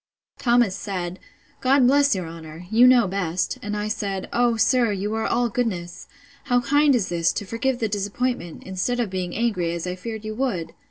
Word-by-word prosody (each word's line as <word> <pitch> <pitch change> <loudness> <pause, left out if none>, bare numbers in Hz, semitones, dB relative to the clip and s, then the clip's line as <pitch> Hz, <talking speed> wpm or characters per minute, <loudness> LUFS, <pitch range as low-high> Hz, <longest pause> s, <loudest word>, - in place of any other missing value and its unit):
Thomas 235 -5 +3
said, 185 -3 -4 0.4
God 260 0 +4
bless 280 -1 +4
your 180 -3 -4
honour! 165 +1 -10
You 240 +3 +7
know 245 -4 +5
best. 180 -2 -2
And 210 0 -3
I 210 0 -2
said, 200 -3 -3
O, 240 -1 +2
sir, 235 +1 +3
you 205 +2 -2
are 220 0 -1
all 240 0 +1
goodness!—How 240 +5 -3
kind 290 +2 +3
is 210 -7 0
this, 170 0 +1
to 205 - -4
forgive 240 +5 -1
the 230 -3 -1
disappointment, 205 -2 -3
instead 190 +7 -2
of 225 -6 -1
being 185 -2 -3
angry, 205 -7 0
as 170 0 -4
I 180 - -2
feared 220 +3 -7
you 215 - -4
would! 215 -9 -2
215 Hz, 185 wpm, -23 LUFS, 185-245 Hz, 0.4 s, You